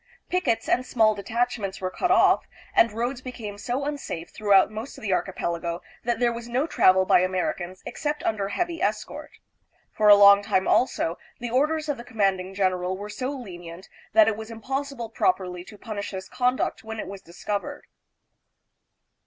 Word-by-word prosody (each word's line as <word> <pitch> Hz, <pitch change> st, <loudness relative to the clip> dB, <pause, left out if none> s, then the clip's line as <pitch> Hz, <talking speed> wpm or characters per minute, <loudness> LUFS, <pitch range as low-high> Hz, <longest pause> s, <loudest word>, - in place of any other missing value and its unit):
Pickets 360 Hz, -11 st, 0 dB
and 255 Hz, -, +2 dB
small 220 Hz, -4 st, +3 dB
detach 235 Hz, +4 st, -1 dB
ments 195 Hz, -2 st, -4 dB
were 185 Hz, -1 st, -3 dB
cut 360 Hz, -, -1 dB
off, 370 Hz, -, +4 dB, 0.3 s
and 230 Hz, -, +5 dB
roads 240 Hz, +4 st, -3 dB
became 225 Hz, -6 st, -7 dB
so 250 Hz, +6 st, -2 dB
unsafe 280 Hz, -, -5 dB
through 210 Hz, -1 st, -3 dB
out 195 Hz, +1 st, +6 dB
most 220 Hz, +5 st, -7 dB
of -, -, -12 dB
the 200 Hz, -3 st, 0 dB
archipelago 170 Hz, -2 st, -2 dB, 0.3 s
that 235 Hz, -1 st, 0 dB
there 240 Hz, -1 st, +2 dB
was 235 Hz, 0 st, -7 dB
no 255 Hz, +5 st, +1 dB
travel 190 Hz, -, +4 dB
by -, -, +5 dB
Americans 185 Hz, 0 st, -2 dB
except 295 Hz, 0 st, -3 dB
under 200 Hz, -3 st, -1 dB
heavy 340 Hz, -, -2 dB
escort. -, -, -3 dB, 0.6 s
For 210 Hz, -1 st, +3 dB
a 205 Hz, -, +11 dB
long 200 Hz, 0 st, +8 dB
time, 190 Hz, -2 st, 0 dB
also, 175 Hz, -9 st, +1 dB, 0.2 s
the 240 Hz, -1 st, -4 dB
orders 305 Hz, +4 st, +1 dB
of 290 Hz, -2 st, -1 dB
the 235 Hz, -, -8 dB
commanding 195 Hz, -5 st, -1 dB
general 185 Hz, -1 st, 0 dB
were 205 Hz, +1 st, -7 dB
so 255 Hz, +5 st, -3 dB
lenient 180 Hz, -9 st, -8 dB, 0.2 s
that 325 Hz, -1 st, +7 dB
it 220 Hz, -, +2 dB
was 220 Hz, +1 st, -8 dB
impossible 260 Hz, +1 st, -4 dB
properly 180 Hz, -, 0 dB
to 210 Hz, -, -13 dB
punish 205 Hz, -1 st, -5 dB
this 190 Hz, -1 st, -6 dB
conduct 250 Hz, 0 st, 0 dB
when 220 Hz, 0 st, -6 dB
it -, -, -3 dB
was 195 Hz, 0 st, -8 dB
discovered. 205 Hz, -, -5 dB
220 Hz, 180 wpm, -25 LUFS, 190-250 Hz, 0.6 s, a